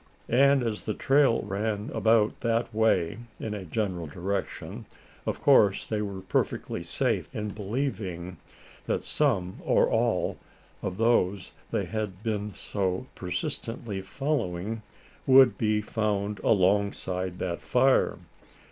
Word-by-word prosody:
And 135 +2 +5
as 110 -3 -3
the 110 - -2
trail 135 -3 +3
ran 105 +1 -2
about 110 -1 +3
that 115 -1 0
way, 105 -4 +2 0.2
in 110 - -4
a 100 -3 -5
general 90 -2 -2
direction, 95 +6 -4 0.4
of - - -1
course 105 -9 +5
they 110 -1 -2
were 100 -2 -4
perfectly 95 - -1
safe - - -1
in 105 0 -2
believing 100 - -3 0.5
that - - 0
some, 100 -12 0
or - - +3
all, - - +1 0.4
of 90 - -3
those 100 -5 +2 0.2
they - - -1
had 105 -3 -4
been 105 -2 -1
so 95 -2 -2
persistently 115 -4 -4
following, 110 - -2 0.5
would 130 -1 +7
be 105 -2 +1
found 105 -1 -1
alongside 95 -2 +1
that 85 -2 -3
fire. 130 +1 +3
105 Hz, 120 wpm, -28 LUFS, 95-115 Hz, 0.5 s, would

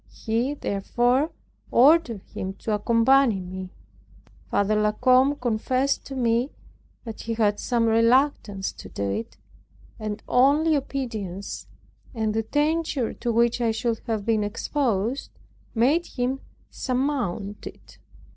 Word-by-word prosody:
He 235 +5 0
therefore 245 +6 +1 0.4
ordered 255 - +4
him 190 0 -6
to 220 - -4
accompany 230 +2 +3
me. 185 0 -7 0.8
Father 200 +1 +2
La 210 0 +2
Combe 255 +5 +4
confessed 255 +2 0
to 270 - -6
me 240 +1 +1 0.5
that 225 -2 -7
he 230 0 -3
had 210 -2 +1
some 235 -2 +1
reluctance 230 -3 +2
to - - -11
do 100 - -4
it, 110 +3 -5 0.6
and 215 -1 -5
only 290 +5 +4
obedience, 225 -9 -4 0.5
and 220 -2 0
the 225 - +1
danger 295 0 0
to 240 - -2
which 235 +1 +2
I 235 - +2
should 225 +1 -1
have 220 -3 -2
been 220 -2 +2
exposed, 230 +2 -1 0.5
made 280 +10 +3
him 255 +1 -2 0.3
surmount 250 -7 -2
it. - - -13
230 Hz, 125 wpm, -25 LUFS, 215-265 Hz, 0.8 s, ordered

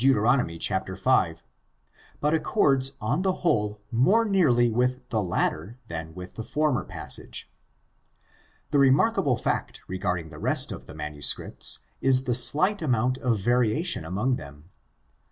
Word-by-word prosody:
chap. 95 +2 -1
5, 95 -4 +1 0.8
but 150 +1 +1
accords 140 -5 +2
on 110 +11 -1
the 190 0 +2
whole 105 -8 +1
more 185 - +3
nearly 150 - +3
with 125 +2 0
the 110 - 0
latter 100 +4 -2
than 80 0 -6
with 90 0 -9
the - - -6
former 150 +2 0
passage. - - -6 1.2
The 145 - +3
remarkable 140 - +3
fact - - -3
regarding 90 -3 -3
the 75 - -10
rest - - +2
of - - -8
the - - -11
manuscripts 75 -1 -2 0.2
is 130 -1 +3
the 125 - 0
slight 155 - +3
amount 130 -3 0
of 120 -4 +1
variation 120 - +1
among 105 +10 -1
them. 75 +5 -12
120 Hz, 135 wpm, -26 LUFS, 95-140 Hz, 1.2 s, more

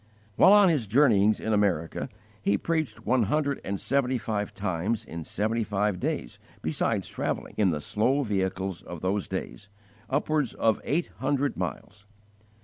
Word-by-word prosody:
While 185 - +7
on 205 -2 +7
his 140 -10 +1
journeyings 110 -4 +4
in 110 - -1
America, 95 -6 0 0.3
he 100 0 +2
preached 160 +1 -2
one 130 -1 +3
hundred 140 +5 0
and 100 0 -3
seventy 130 -1 +1
five 105 -3 -2
times 105 +2 -2
in 85 -1 -7
seventy 110 +3 0
five 105 -2 0
days, - - -3 0.2
besides - - 0
travelling, - - -3
in 105 -3 +3
the 75 -3 -1
slow 130 - +1
vehicles 95 -4 -2
of 85 -3 -8
those 95 +2 -1
days, 80 +12 -6 0.4
upwards 145 -1 0
of 110 -1 +2
eight 165 +5 0
hundred 140 +2 0
miles. 105 +1 -6
105 Hz, 150 wpm, -27 LUFS, 95-135 Hz, 0.4 s, While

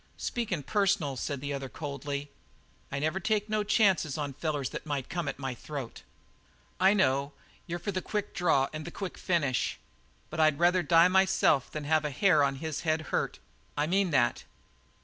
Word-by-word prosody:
"Speakin' 210 -11 -2
personal," 195 -7 +1
said 140 +1 -3
the 145 0 -3
other 135 -1 -4
coldly, 140 0 -5 0.6
"I 140 - -2
never 155 +6 0
take 210 +2 0
no 215 -1 0
chances 195 - +2
on 145 -2 -3
fellers 145 -2 -2
that - - -5
might 140 -3 -3
come 175 -1 -3
at - - -3
my 135 -2 -3
throat." 135 -1 -7 0.8
"I 190 +2 +5
know; 140 -6 +2 0.3
you're 170 0 -3
for 175 +4 -3
the 185 -1 -2
quick 210 +2 -3
draw 160 -7 +2
and 155 0 -5
the 170 - -6
quick 190 +1 -6
finish. 145 - 0 0.5
But - - -5
I'd 155 -2 +4
rather 175 +2 +4
die 165 +1 +6
myself 190 -7 +3
than 155 - -5
have 155 +1 +2
a 150 - -1
hair 155 +1 +4
of 135 -1 +1
his 155 +1 -4
head 155 -1 +1
hurt. - - 0 0.4
I 145 - +2
mean 190 +3 +2
that!" 135 -6 +2
155 Hz, 185 wpm, -29 LUFS, 140-185 Hz, 0.8 s, die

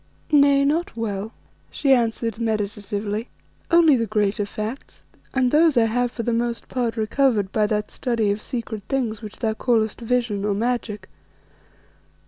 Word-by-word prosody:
"Nay, 280 -1 +5
not 310 -2 0
well," 215 -1 -3 0.4
she 275 -2 +2
answered, 230 -2 0
meditatively, 210 0 -2 0.4
"only 335 -4 +6
the 230 -2 0
greater 205 0 0
facts, 215 +6 -6 0.3
and 255 -2 +1
those 310 -2 +4
I 230 - +5
have 245 +2 0
for 235 - -5
the 235 - 0
most 235 0 -2
part 240 -2 -2
recovered 220 -3 +1
by 215 -1 +2
that 210 0 -2
study 230 -5 0
of 205 +1 -3
secret 230 -3 -4
things 235 -5 -1
which 215 -2 -9
thou 220 -2 0
callest 220 -1 0
vision 230 -4 0
or 205 -1 0
magic. 215 -3 -2
230 Hz, 150 wpm, -23 LUFS, 210-250 Hz, 0.4 s, only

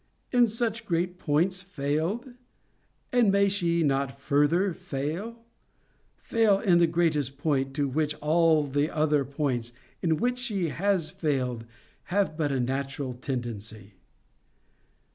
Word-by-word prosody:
In 245 -2 +5
such 225 0 -2
great 180 +1 -1
points 180 +5 +1
failed? 180 - -2 0.8
And 240 -5 +4
may 200 0 +4
she 170 -4 +1
not 140 -2 +1
further 155 +7 +2
fail? 175 +14 -5 0.7
Fail 220 -4 +2
in 175 -4 +4
the 170 - +5
greatest 155 -5 0
point, 135 -2 0
to 145 -1 +1
which 150 +2 -1
all 160 0 +3
the 145 +2 0
other 150 -3 +2
points, 130 -4 -2 0.3
in 160 -2 +1
which 250 +4 0
she 205 -9 -1
has 180 -1 0
failed, 125 -8 -2 0.4
have 190 -3 0
but 150 -3 0
a 135 - 0
natural 135 +1 -2
tendency?' 115 -5 -6
155 Hz, 125 wpm, -27 LUFS, 140-190 Hz, 0.8 s, In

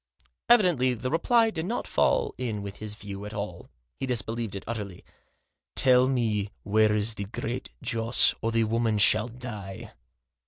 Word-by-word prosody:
Evidently 175 - +4
the 130 +3 -4
reply 225 +7 +3
did 160 -3 -4
not 235 - -2
fall - - +1
in 110 -5 -3
with 100 0 -7
his 105 -1 -6
view 100 -2 -8
at 105 +1 -7
all; 100 -4 -6 0.3
he 135 - -3
disbelieved 115 -3 -2
it 100 - -6
utterly. 105 -6 -6 0.4
" - - -55
Tell 125 0 +5
me 110 -6 0
where 105 +1 +3
is 105 +2 +1
the 100 -2 -5
Great 100 - -5
Joss, 115 +1 +4
or 115 - -1
the 115 0 +2
woman 115 0 0
shall 105 +2 +5
die." 115 -6 -8
115 Hz, 165 wpm, -27 LUFS, 105-125 Hz, 0.4 s, Tell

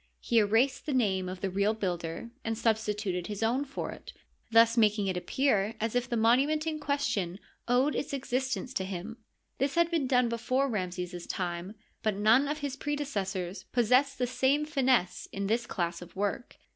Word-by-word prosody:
He 235 -2 +2
erased 245 +7 +2
the 290 - 0
name 190 -7 +1
of 185 0 -7
the 195 - -1
real 200 +3 +1
builder 180 +1 -3
and 225 -1 -2
substituted 210 -5 0
his 210 +1 -4
own 245 +5 +2
for 275 - -5
it, - - -11 0.4
thus 230 0 +6
making 210 -3 +3
it 190 -1 -1
ap 180 0 -5
pear 225 -6 +1
as 225 0 -1
if 245 0 0
the 235 - 0
monument 270 +8 +3
in 315 -1 -2
question 280 - -1 0.3
owed 255 +4 +3
its - - -3
existence 260 -1 -2
to 190 - -1
nim. 195 +4 -6 0.4
.This 275 +2 0
had 340 0 +3
been 315 -6 +1
done 250 -2 +3
before 255 +4 0
Ramses's 180 -5 -4
time, 180 +2 -3 0.3
but 215 -2 0
none 220 +7 +4
of 300 +1 -3
his 280 -2 -3
predecessors 205 - -3
possessed 255 +4 +3
the 250 - +1
same 265 +4 +1
finesse 260 - +1
in 200 0 -3
this 235 +4 0
class 170 -6 -2
of 175 0 -12
work. 205 +5 -3
230 Hz, 185 wpm, -30 LUFS, 195-265 Hz, 0.4 s, thus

